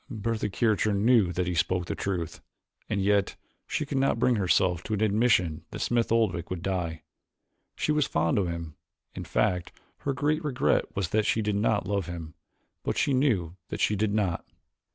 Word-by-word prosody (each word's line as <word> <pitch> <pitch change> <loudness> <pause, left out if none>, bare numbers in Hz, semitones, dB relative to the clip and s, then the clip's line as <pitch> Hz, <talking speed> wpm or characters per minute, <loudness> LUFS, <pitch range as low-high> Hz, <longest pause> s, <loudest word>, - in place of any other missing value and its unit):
Bertha 110 0 -2
Kircher 110 0 +1
knew 105 -2 +4
that 90 +1 -1
he 90 - -1
spoke 90 +1 +1
the - - -3
truth, 85 -4 -3 0.5
and 100 -3 0
yet 100 0 +2 0.3
she 150 - -1
could 140 -2 -1
not 135 -3 +2
bring 125 +2 +3
herself 90 -3 +2
to 110 - -2
an 105 - -3
admission 105 -7 +2
that - - -7
Smith 120 -2 0
Oldwick 95 -7 +1
would 90 -2 -4
die. 85 -4 -2 0.7
She - - 0
was 150 -2 +2
very - - -24
fond 85 +5 +2
of 95 - 0
him, 85 -2 -5 0.4
in - - -6
fact 90 -1 0 0.3
her 140 - -1
great 150 +4 0
regret 140 -4 +1
was 95 -4 -1
that 110 +1 +1
she 110 - +1
did 105 -1 0
not 105 -1 +1
love 100 -3 -1
him, 85 -2 -7 0.5
but - - -2
she 140 - +2
knew 105 - +1
that - - -5
she 105 - +2
did 105 +1 0
not. 100 -5 0
100 Hz, 195 wpm, -27 LUFS, 90-115 Hz, 0.7 s, knew